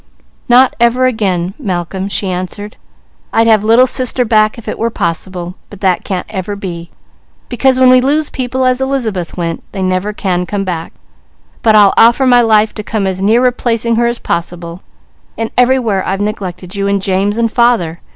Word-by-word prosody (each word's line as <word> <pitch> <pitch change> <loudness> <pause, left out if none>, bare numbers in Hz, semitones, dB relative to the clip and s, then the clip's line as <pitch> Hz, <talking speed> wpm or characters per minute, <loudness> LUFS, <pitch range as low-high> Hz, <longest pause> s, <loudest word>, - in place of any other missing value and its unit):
"Not 250 +2 +5
ever 235 +2 +3
again 195 -7 -1
Malcolm," 190 - -3
she 200 - -2
answered. 185 +3 -5 0.6
"I'd 225 - +2
have 220 -2 +4
Little 230 +4 +5
Sister 255 -1 +1
back 215 0 +2
if 235 - -12
it - - -4
were 230 - 0
possible, 175 -2 -4 0.2
but 205 - -12
that 185 -3 +1
can't 185 -2 -3
ever 200 0 -5
be, 175 -4 -7 0.6
because 260 +1 +1
when 255 -1 +6
we 255 0 +5
lose 295 +4 0
people 260 0 -2
as 255 0 +1
Elizabeth 230 -12 -2
went, 165 -1 -3
they 195 - -3
never 185 +2 -1
can 180 -3 -2
come 195 +3 -2
back; 170 -4 -5 0.7
but 220 -2 +3
I'll 205 -2 +6
offer 235 +4 +5
my 245 -1 +5
life 220 -2 +3
to 210 - -6
come 210 -1 -2
as 190 -1 -2
near 225 +5 +3
replacing 235 -2 0
her 235 0 +2
as 235 0 -2
possible, 170 -1 -4 0.6
and 225 0 -3
everywhere 245 -6 +2
I've 195 +1 -2
neglected 190 -3 -5
you, 200 -1 -2
and 200 0 +1
James, 195 +2 -1
and 230 -1 0
father. 225 -10 +1
210 Hz, 180 wpm, -13 LUFS, 185-240 Hz, 0.7 s, when